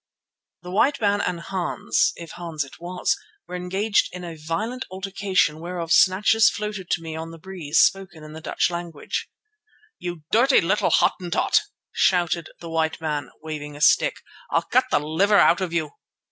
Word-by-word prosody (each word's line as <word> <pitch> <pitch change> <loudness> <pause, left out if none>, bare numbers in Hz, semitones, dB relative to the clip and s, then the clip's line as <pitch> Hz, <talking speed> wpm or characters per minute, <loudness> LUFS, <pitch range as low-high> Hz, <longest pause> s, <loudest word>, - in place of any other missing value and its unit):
The 180 - -7
white 270 +9 +2
man 205 -2 +2
and 175 - -2
Hans, 180 0 0
if 170 -2 -9
Hans 165 -4 -4
it 140 - -14
was, 180 +1 -1 0.3
were 180 - -6
engaged 190 +4 +1
in 175 -2 -7
violent 210 +12 -3
altercation 190 -4 0
whereof 170 -1 -5
snatches 215 +4 +5
floated 210 -3 -5
to 165 - 0
me 160 -1 -6
on 160 +1 -5
the 165 - -10
breeze, 165 -4 -4
spoken 185 -5 +2
in 155 0 -10
the 160 - -9
Dutch - - 0
tongue. 175 -1 -5 1.1
"You 175 -3 -6
dirty 260 +5 +5
little 190 +5 +1
Hottentot!" 175 -2 +2 0.3
shouted 175 -2 +1
the 170 - -7
white 160 -1 0
man, 150 -4 -3
waving 150 -2 -6
a - - -10
stick, - - +4 0.3
"I'll - - +1
cut 255 +1 +2
the - - +3
liver 185 +8 +2
out 180 - +5
of 185 -3 -2
you. 160 -3 -1
175 Hz, 165 wpm, -23 LUFS, 160-195 Hz, 1.1 s, snatches